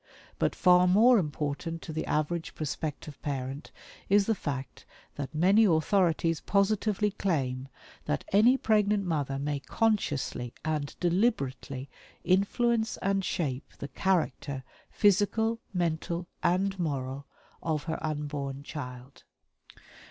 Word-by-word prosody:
But - - +1
far 180 0 +5
more 225 +6 +6
important 155 +1 -3
to 160 - -6
the 160 - -3
average 160 +2 -1
prospective 150 -1 -5
parent 135 0 -4 0.4
is 200 0 +5
the 225 - +2
fact 140 - -5 0.3
that 145 +1 -6
many 190 +7 +5
authorities 165 -1 +2
positively 210 +1 +1
claim 135 -10 -1 0.4
that 75 - -1
ANY 235 +6 +6
PREGNANT 210 -3 +2
MOTHER 145 -5 -1
MAY 145 +1 -2
CONSCIOUSLY 150 - -1
AND 150 -2 -2
DELIBERATELY 145 - 0 0.4
INFLUENCE 220 +4 +2
AND 195 0 +1
SHAPE 140 -8 -3
THE 140 - -6
CHARACTER, 145 -5 -1 0.3
PHYSICAL, 220 +3 +2
MENTAL, 170 -1 -1 0.2
AND 190 +2 +1
MORAL 140 -4 -3 0.3
OF 155 -3 -1
HER 160 -1 -3
UNBORN 145 -2 -3
CHILD. 125 -2 -8
165 Hz, 115 wpm, -29 LUFS, 140-195 Hz, 0.4 s, more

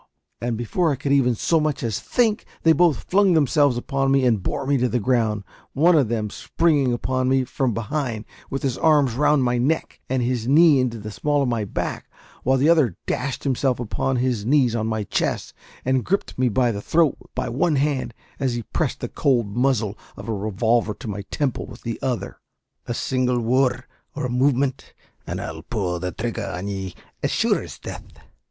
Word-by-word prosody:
and, 120 -1 -1
before 155 - 0
I - - 0
could 140 +1 -3
even 130 -4 +3
so 165 +8 +2
much 150 -3 -1
as 110 -4 -1
think, 225 -3 +1 0.2
they 165 - +6
both 160 -6 +3
flung 195 -1 +3
themselves 145 -4 +3
upon 135 +2 -1
me 135 -1 +3
and 115 -5 +2
bore 110 - -3
me 140 +1 +2
to 125 0 +1
the 125 - 0
ground, 110 -3 +1 0.3
one 165 +5 +4
of 140 -6 +4
them 110 -2 -2
springing 145 -3 +1
upon 130 +1 0
me 130 0 +3
from 130 0 -1
behind, 115 -2 -3 0.2
with 135 - -4
his 130 -3 -1
arms 145 -6 +4
round 150 +2 +3
my 125 -1 +1
neck 150 +6 -1
and 130 -1 +1
his 120 -2 -1
knee 150 0 +6
into 125 -2 0
the 105 0 -7
small 145 +5 0
of 130 - 0
my 115 -3 -1
back, - - -4 0.3
while 130 +2 +2
the 135 +3 +3
other 155 - +3
dashed 130 +1 -2
himself 130 -2 0
upon 125 +3 -1
his 125 -4 0
knees 125 -1 +3
on 110 -1 -1
my 110 -1 -1
chest, - - -2 0.3
and 130 -1 +2
gripped 200 +2 -1
me 125 -1 +2
by 120 +2 +2
the 100 -2 -4
throat 160 +4 +2 0.2
by 130 - -2
one 150 +7 +1
hand, 140 -2 0 0.3
as 130 -4 0
he 120 - -3
pressed - - -1
the - - -2
cold 120 -7 0
muzzle 120 -5 +1 0.2
of - - -9
a 115 - -1
revolver 110 +2 0
to - - -9
my 100 -1 -4
temple 140 -4 -2
with - - -12
the 115 -1 -4
other. 125 -3 -3 0.5
"A 120 - -2
single 125 -1 0
worrud 125 +1 +1 0.3
or 145 -2 -2
a - - -2
movement, 135 +1 0 0.3
and - - -3
I'll - - -6
pull 90 -6 -2
the 90 +1 -3
thrigger 115 +2 -4
on 95 +3 -5
ye, 95 -2 -5 0.3
as - - 0
sure - - +1
as - - -9
death!" - - -9
125 Hz, 200 wpm, -23 LUFS, 115-140 Hz, 0.5 s, they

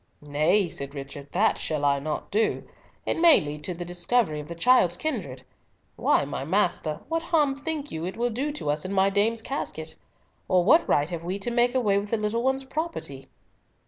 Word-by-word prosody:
"Nay," 155 +7 +2
said 140 -3 -5
Richard, 140 0 -8
"that 210 +5 +2
shall 150 -2 -1
I 140 0 +3
not 150 +2 -4
do. 215 +2 +1 0.4
It - - -1
may 335 -2 +8
lead 150 0 -6
to 180 - -3
the 175 +1 -6
discovery 175 -1 0
of 150 - -8
the 170 - -7
child's 180 -3 +4
kindred. 180 - -4 0.5
Why, - - +2
my 140 -1 -4
master, 170 -2 0
what 330 +2 -1
harm 300 -5 +2
think 295 +1 -4
you 160 0 -4
it 185 - -6
will 240 +1 0
do 275 +7 -2
to 150 - -2
us 150 +1 -2
in 185 - -4
my 195 0 +3
dame's 220 +3 +1
casket? 160 - -4 0.5
Or 185 -2 +3
what 320 - +4
right 145 +4 +2
have 170 -1 -4
we 180 +3 -3
to 220 +4 -3
make 240 +1 +2
away 205 -6 +3
with 205 +1 -6
the 230 - +1
little 215 +2 -1
one's 265 +2 0
property?" 270 - -5
195 Hz, 205 wpm, -26 LUFS, 155-245 Hz, 0.5 s, may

